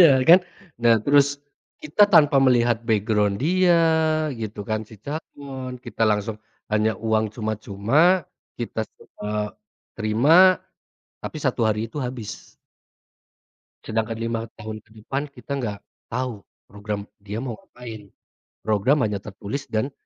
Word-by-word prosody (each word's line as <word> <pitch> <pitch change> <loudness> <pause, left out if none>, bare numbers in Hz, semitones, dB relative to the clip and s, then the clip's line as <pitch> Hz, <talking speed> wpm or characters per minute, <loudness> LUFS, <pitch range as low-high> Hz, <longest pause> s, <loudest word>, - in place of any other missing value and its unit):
Iya 170 - +10 0.2
kan? 175 +2 +10 0.4
Nah, 115 -1 +6
terus 140 -1 +5 0.6
kita 260 -9 +3
tanpa 150 -7 +6
melihat 120 -3 +4
background 105 -2 +2
dia 180 +1 +4 0.6
gitu 105 -1 -5
kan, 110 0 0
si - - -12
calon, 135 -4 -6
kita 115 -1 -4
langsung 105 +1 -1 0.4
hanya 110 +1 +3
uang 110 -1 0
cuma-cuma, 110 - +2 0.3
kita 120 -2 -3 0.2
semua 105 0 -5 0.4
terima, 150 +13 +5 0.6
tapi - - -6
1 130 -4 0
hari 110 -1 +1
itu - - -13
habis. 120 -5 -8 1.3
Sedangkan 110 0 -2
5 115 0 -1 0.2
tahun 110 -1 -7
ke - - -30
depan, 135 +6 -3
kita 140 0 -5
nggak 105 -4 -3 0.3
tahu 125 -4 -3 0.2
program 105 0 -5 0.2
dia 105 +2 -4
mau 120 -4 -4
ngapain. 115 -4 -11 0.6
Program 110 +7 +3
hanya 105 -2 -2
tertulis 105 +8 -6
dan 110 +5 -1
115 Hz, 125 wpm, -23 LUFS, 105-140 Hz, 1.3 s, Iya